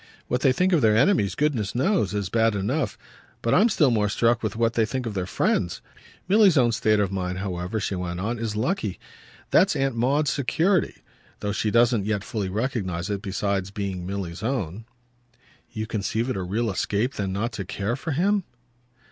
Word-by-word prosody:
What 125 +1 -1
they 135 - +5
think 180 +8 +2
of 165 - +4
their 110 -2 +4
enemies, 130 - +3
goodness 130 -10 0
knows, 125 - +1
is 100 -3 -2
bad 115 +1 +2
enough; 125 +9 -1 0.5
but 115 - +2
I'm 230 - +5
still 150 - +3
more 105 -3 +2
struck 115 +3 +2
with 110 - -2
what 115 0 +1
they 115 - +2
think 125 +3 -3
of 115 - -3
their 95 -2 -2
friends. 90 -1 0 0.5
Milly's 195 -4 +5
own 120 -3 +4
state 110 -1 +2
of 100 -2 +1
mind, 90 -1 -2
however," 95 +2 -3
she 100 - -2
went 90 -1 -3
on, 110 +5 -2
"is 110 -2 -3
lucky. 110 - -1 0.5
That's - - +4
Aunt 135 -2 0
Maud's 135 +5 +2
security, 165 +7 0 0.4
though 105 - -1
she 105 +1 0
doesn't 115 -2 +3
yet 105 -2 -1
fully 105 -4 -3
recognise 100 -4 -2
it 100 -1 -2
besides 100 -1 -2
being 100 -3 -4
Milly's 95 -3 -4
own." 110 - -3 0.9
"You 110 - -4
conceive 110 +3 -2
it - - -2
a 95 - -2
real 105 +5 -1
escape 105 +7 -1
then 95 -2 -3
not 110 +5 -2
to 110 -3 -5
care 100 +5 -2
for 150 +3 -4
him?" 195 +6 +2
110 Hz, 190 wpm, -25 LUFS, 100-130 Hz, 0.9 s, they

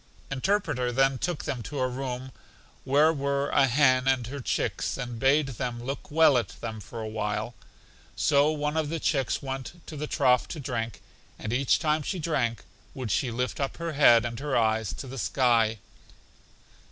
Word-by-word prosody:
Interpreter 135 -4 0
then 135 +1 +2
took 175 -4 -2
them 125 - -3
to 140 +4 -5
a 130 - +2
room 130 0 -5 0.5
where 150 +4 +4
were 140 -1 -1
a 135 - +4
hen 130 0 +3
and 130 -2 +2
her 140 +4 -6
chicks, 125 - -1
and 120 -3 -5
bade 135 +3 +3
them 120 -1 -4
look 135 +3 -5
well 150 -4 +5
at 110 - -7
them 110 -2 -5
for 115 +3 -9
a 110 - -4
while. 110 +1 -3 0.6
So 145 0 +3
one 150 0 -1
of 155 -2 0
the 165 +1 -2
chicks 135 -5 0
went 135 +1 -5
to 155 - -8
the 150 +1 -4
trough 125 -4 +3
to 160 - -6
drink, 115 -6 -4 0.3
and 110 - -4
each 135 +2 +3
time 155 -1 +1
she 185 +6 -3
drank 135 - -1 0.3
would 125 -6 -4
she 130 +6 +1
lift 125 +2 -2
up 135 -1 -2
her 170 -1 -3
head 120 -6 +6
and 120 0 -4
her 145 -2 -1
eyes 110 -2 +1
to - - -7
the 135 0 -7
sky. 115 -3 +2
130 Hz, 185 wpm, -27 LUFS, 120-145 Hz, 0.6 s, head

